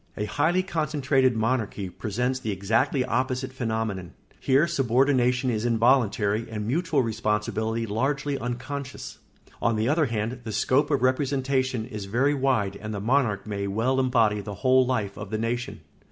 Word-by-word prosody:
] - - -32
A 105 - -1
highly 160 - +1
concentrated 140 -6 +1
monarchy 110 -3 -1
presents 120 +7 -2
the 110 - -4
exactly 115 - +1
opposite 130 +2 -1
phenomenon. 110 -7 -3 0.3
Here 135 +4 +3
subordination 130 -4 +2
is 110 -1 -2
involuntary 115 -2 +2
and 105 -2 -4
mutual 150 +2 +1
responsibility 110 0 -1
largely 135 +6 -1
unconscious. 130 +3 -5 0.4
On 115 -1 +2
the 110 +1 0
other 155 +2 +2
hand, 115 +2 -3
the 110 -1 -5
scope 140 +7 +2
of 140 -4 +1
representation 130 -2 0
is 105 -5 -6
very 125 +8 +1
wide 125 -8 0
and 105 0 -6
the - - -3
monarch 110 -2 +1
may 100 -2 -3
well 115 +7 0
embody 115 -5 +2
the 100 0 -7
whole 130 0 +6
life 115 -6 -1
of 100 -1 -7
the 110 - -2
nation. 120 +2 -3
120 Hz, 155 wpm, -26 LUFS, 110-135 Hz, 0.4 s, whole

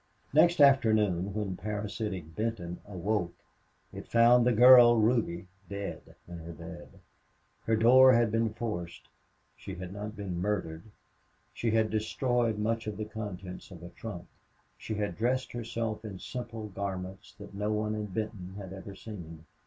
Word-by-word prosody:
Next 170 +3 +5
afternoon, 110 -9 +4
when 105 -3 -2
parasitic 105 -4 -4
Benton 105 -6 -3
awoke, 95 -2 -2 0.6
it - - -8
found 120 +1 +5
the - - +5
girl 120 0 +8
Ruby 110 -6 +1 0.2
dead 100 0 -6
in 85 -1 -8
her 85 +1 -8
bed. 80 - -11 0.7
Her 110 - +2
door 130 +4 +7
had 120 -3 +3
to 115 - +1
be 115 -1 +2
forced. 90 -8 -5 0.5
She 95 - -8
had 90 +1 -7
not 105 +1 -6
been 95 -4 -4
murdered. 90 -5 -2 0.7
She 115 - -1
had 110 0 +2
destroyed 115 +1 0
much 115 +1 -1
of 105 -2 -4
the 110 - -3
contents 100 -4 -7
of 90 -3 -12
a 85 - -8
trunk. 90 0 -8 0.5
She 110 - -5
had 105 -4 -3
dressed 125 +4 0
herself 115 -2 -4
in 105 -4 -7
simple 115 0 -6
garments 95 0 -6
that 100 -1 -11
no 105 +2 -2
one 105 0 -1
in 105 -1 -3
Benton 95 -2 -5
had 95 -2 -8
ever 95 +1 -9
seen. 85 -7 -10
105 Hz, 155 wpm, -30 LUFS, 95-115 Hz, 0.7 s, girl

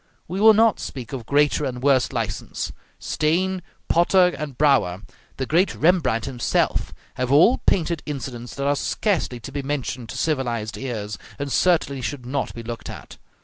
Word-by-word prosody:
We 185 +4 -3
will 220 0 +8
not 225 0 +4
speak 125 -2 -7
of 125 -4 -6
greater 145 +1 +3
and 125 -2 -4
worse 135 -3 +3
license. - - -3 0.3
Steen, 180 +4 0 0.3
Potter, 180 +1 +4
and 140 -3 -6
Brouwer, 120 -11 +2 0.3
the 130 - -2
great 175 +8 +2
Rembrandt 160 -9 +2
himself, 130 -3 0 0.3
have 125 0 -1
all 165 - +6
painted 170 -3 +2
incidents 125 -4 -6
that 140 - -3
are 145 0 +3
scarcely 160 - -1
to 135 - -8
be 140 +1 -3
mentioned 135 -4 -3
to - - -6
civilized 120 -8 -1
ears, 110 -6 -5 0.2
and 140 0 -4
certainly 155 -7 +2
should 125 0 -4
not 135 +2 -2
be 115 - -7
looked 115 0 -6
at. - - -10
140 Hz, 165 wpm, -23 LUFS, 125-165 Hz, 0.3 s, will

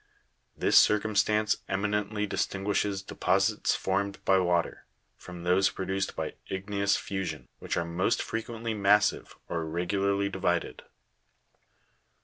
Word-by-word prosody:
This - - +6
circumstance 105 0 +2
eminently 105 +1 -1
distinguishes 100 0 -1
deposits 95 +3 +1
formed 100 +1 -1
by 95 -1 +4
water, 90 -2 0 0.3
from 90 -1 -10
those 90 +2 +3
produced 95 +1 -3
by - - -3 0.2
igneous 100 +1 0
fusion, 95 -1 -4
which - - -3
are 85 - 0
most 85 0 0
frequently 115 0 -4
massive, 105 0 +2
or 85 - -2
irregularly 100 +5 0
divided. 90 -3 -1
100 Hz, 110 wpm, -28 LUFS, 95-105 Hz, 0.3 s, This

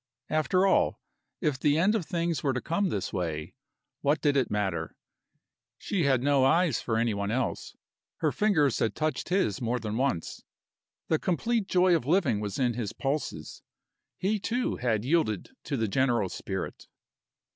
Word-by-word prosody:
After 155 +5 +2
all, 195 - +2 0.4
if 150 -6 0
the 145 +1 +3
end 190 +6 +3
of 210 -8 -1
things 170 -2 -1
were 135 -2 +1
to 130 - -1
come 175 +7 0
this 100 - -3
way, 80 -4 -3 0.5
what 145 +2 +2
did 145 -2 +2
it 130 -4 +2
matter? 95 -6 -2 0.8
She 185 -7 -1
had 130 -3 +2
no 140 -1 +3
eyes 165 +1 +3
for 110 -2 -1
any 115 -1 +1
one 100 0 -2
else, 125 +3 -2 0.4
her - - 0
fingers 155 - +2
had 110 - 0
touched 155 -1 -2
his 180 - +1
more 120 +1 0
than 110 -2 -4
once. 130 -10 -1 0.7
The 160 - +2
complete 220 +4 0
joy 180 -1 +4
of 135 -6 -2
living 150 - +2
was 105 -2 -4
in 125 -3 +1
his 115 -4 -4
pulses. 135 - -3 0.6
He, 205 +3 0
too, 240 +5 -1
had 115 -3 0
yielded 145 - 0
to 140 - -2
the 115 -1 0
general 120 -3 +1
spirit. 95 0 -5
135 Hz, 165 wpm, -28 LUFS, 110-170 Hz, 0.8 s, joy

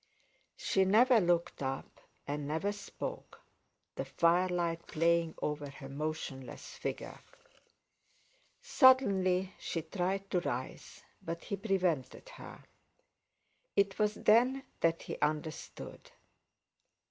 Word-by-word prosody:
She 190 - +2
never 230 +5 +5
looked 170 -3 +1
up, 135 0 -4 0.3
and 145 0 -3
never 160 +7 0
spoke, 205 -1 -7 0.5
the - - -3
firelight 170 -1 +1
playing 165 0 +2
over 150 -1 -2
her 135 0 -10
motionless 140 -3 -5
figure. - - -5 1.4
Suddenly 195 -8 +4
she 165 - -3
tried 195 +3 -2
to 180 - +3
rise, 130 -6 -5 0.2
but 165 0 -5
he 200 - -3
prevented 190 - -1
her; - - -11 1.1
it 200 0 +2
was 210 0 +2
then 250 +5 +4 0.2
that 165 0 +1
he - - -6
understood. 155 +1 -4
175 Hz, 100 wpm, -33 LUFS, 155-200 Hz, 1.4 s, never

